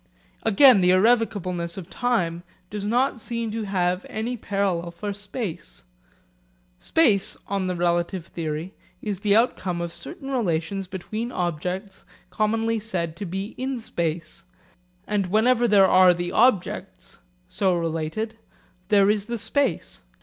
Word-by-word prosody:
Again 225 Hz, 0 st, +6 dB
the 180 Hz, -, +4 dB
irrevocableness 185 Hz, -4 st, +2 dB
of 180 Hz, -4 st, -7 dB
time 180 Hz, -9 st, -1 dB, 0.3 s
does 205 Hz, -1 st, -4 dB
not 245 Hz, +4 st, +1 dB
seem 230 Hz, -1 st, -3 dB
to 220 Hz, 0 st, -3 dB
have 185 Hz, -1 st, 0 dB
any 230 Hz, +3 st, -3 dB
parallel 195 Hz, -6 st, -1 dB
for 200 Hz, +4 st, -5 dB
space. 200 Hz, -, -6 dB, 1.0 s
Space, 220 Hz, -, +2 dB
on 195 Hz, -2 st, -2 dB
the 180 Hz, -, -1 dB
relative 175 Hz, 0 st, 0 dB
theory, 160 Hz, +3 st, -5 dB, 0.3 s
is 205 Hz, -4 st, -2 dB
the 205 Hz, 0 st, +3 dB
outcome 195 Hz, -6 st, +1 dB
of 170 Hz, -1 st, -4 dB
certain 290 Hz, -6 st, -8 dB
relations 195 Hz, -4 st, -1 dB
between 215 Hz, +6 st, -5 dB
objects 180 Hz, +3 st, -3 dB, 0.3 s
commonly 225 Hz, +3 st, 0 dB
said 175 Hz, -7 st, -2 dB
to 200 Hz, -, -5 dB
be 195 Hz, +5 st, -4 dB
in 260 Hz, 0 st, -2 dB
space; 170 Hz, -5 st, -4 dB, 0.6 s
and 205 Hz, -3 st, 0 dB
whenever 240 Hz, +5 st, +3 dB
there 200 Hz, -3 st, +6 dB
are 185 Hz, -1 st, +6 dB
the 175 Hz, 0 st, -3 dB
objects, 220 Hz, -3 st, 0 dB, 0.3 s
so 190 Hz, -3 st, +1 dB
related, 170 Hz, +7 st, -3 dB, 0.5 s
there 200 Hz, -2 st, +5 dB
is 205 Hz, -1 st, +2 dB
the 235 Hz, +1 st, -3 dB
space. 280 Hz, +4 st, -1 dB
195 Hz, 135 wpm, -24 LUFS, 175-225 Hz, 1.0 s, Again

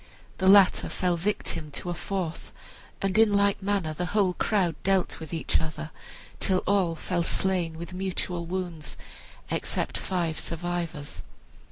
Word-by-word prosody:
The 190 Hz, -, +2 dB
latter 195 Hz, -1 st, +7 dB
fell 180 Hz, -1 st, +1 dB
victim 170 Hz, -3 st, -2 dB
to 175 Hz, -, -3 dB
a -, -, 0 dB
fourth, 175 Hz, -1 st, -4 dB, 0.5 s
and 195 Hz, -1 st, +1 dB
in 225 Hz, -2 st, +6 dB
like 200 Hz, 0 st, +3 dB
manner 195 Hz, -5 st, 0 dB
the 175 Hz, +3 st, -2 dB
whole 190 Hz, -3 st, +4 dB
crowd 185 Hz, -3 st, +1 dB
dealt 190 Hz, -1 st, +1 dB
with 160 Hz, -2 st, -8 dB
each 165 Hz, -2 st, +1 dB
other 155 Hz, 0 st, -5 dB, 0.5 s
till 185 Hz, -1 st, +1 dB
all 190 Hz, -4 st, +2 dB
fell, 175 Hz, +2 st, -1 dB
slain 175 Hz, -2 st, 0 dB
with 170 Hz, +2 st, -7 dB
mutual 180 Hz, -2 st, -2 dB
wounds, 175 Hz, -5 st, -4 dB, 0.5 s
except -, -, -1 dB
five 170 Hz, -4 st, -1 dB
survivors. 170 Hz, -3 st, -4 dB
180 Hz, 145 wpm, -27 LUFS, 165-190 Hz, 0.5 s, latter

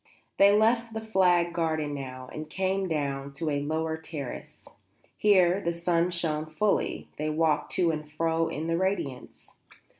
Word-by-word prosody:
They 200 Hz, 0 st, +7 dB
left 225 Hz, +2 st, +2 dB
the -, -, -1 dB
flagged 180 Hz, -5 st, +2 dB
garden 155 Hz, -3 st, -1 dB
now, 130 Hz, -2 st, -6 dB
and 155 Hz, 0 st, -6 dB
came 190 Hz, +2 st, -1 dB
down 140 Hz, -3 st, -2 dB
to 155 Hz, +2 st, -2 dB
a 145 Hz, 0 st, 0 dB
lower 160 Hz, +2 st, -2 dB
terrace. 155 Hz, -5 st, -7 dB, 0.5 s
Here 190 Hz, -2 st, +4 dB
the 170 Hz, -, 0 dB
sun 170 Hz, 0 st, +1 dB
shone 155 Hz, -3 st, -1 dB
fully; 200 Hz, +7 st, -1 dB
they 155 Hz, +1 st, -1 dB
walked 155 Hz, -1 st, +1 dB
to 170 Hz, -2 st, +2 dB
and 155 Hz, -1 st, -5 dB
fro 165 Hz, +1 st, 0 dB
in 155 Hz, 0 st, -4 dB
the 165 Hz, 0 st, 0 dB
radiance. 185 Hz, -9 st, -3 dB
165 Hz, 155 wpm, -28 LUFS, 150-185 Hz, 0.5 s, They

